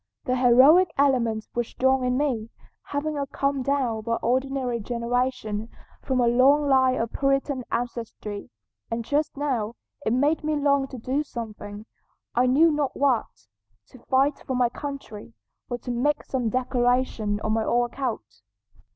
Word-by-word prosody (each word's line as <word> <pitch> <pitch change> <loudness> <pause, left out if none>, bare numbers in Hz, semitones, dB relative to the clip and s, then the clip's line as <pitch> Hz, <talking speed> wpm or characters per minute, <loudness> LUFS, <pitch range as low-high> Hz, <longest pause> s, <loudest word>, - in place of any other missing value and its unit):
The 255 - +1
heroic 265 +9 +6
element 240 -6 +2
was 240 -1 -1
strong 265 0 +1
in 250 0 +1
me, 250 -6 -1 0.4
having 285 0 -2
come 275 -1 0
down 255 -5 0
by 230 +1 -1
ordinary 260 0 0
generation 235 -1 -2 0.3
from 260 -1 -1
a 240 - +3
long 275 +5 +4
line 260 -1 +3
of 230 0 -2
Puritan 275 -1 0
ancestry, 230 -4 -4 0.4
and 230 0 -3
just 295 +3 -1
now 240 -6 -1 0.3
it 220 - 0
made 285 +7 +2
me 305 0 0
long 280 -2 +2
to 260 - -9
do 260 +5 -1
something, 215 -6 -7 0.5
I 250 +2 +3
knew 310 +6 +5
not 295 -2 -1
what: 270 -4 +2 0.6
to 255 - -15
fight 275 +2 +3
for 260 - -4
my 250 -1 +3
country, 260 -6 -8 0.4
or 245 - -2
to 245 - -6
make 255 +5 0
some 250 -4 -2
declaration 245 -3 0
on 215 - 0
my 225 0 +1
own 240 +2 +2
account." 230 - -5
255 Hz, 150 wpm, -25 LUFS, 235-275 Hz, 0.6 s, heroic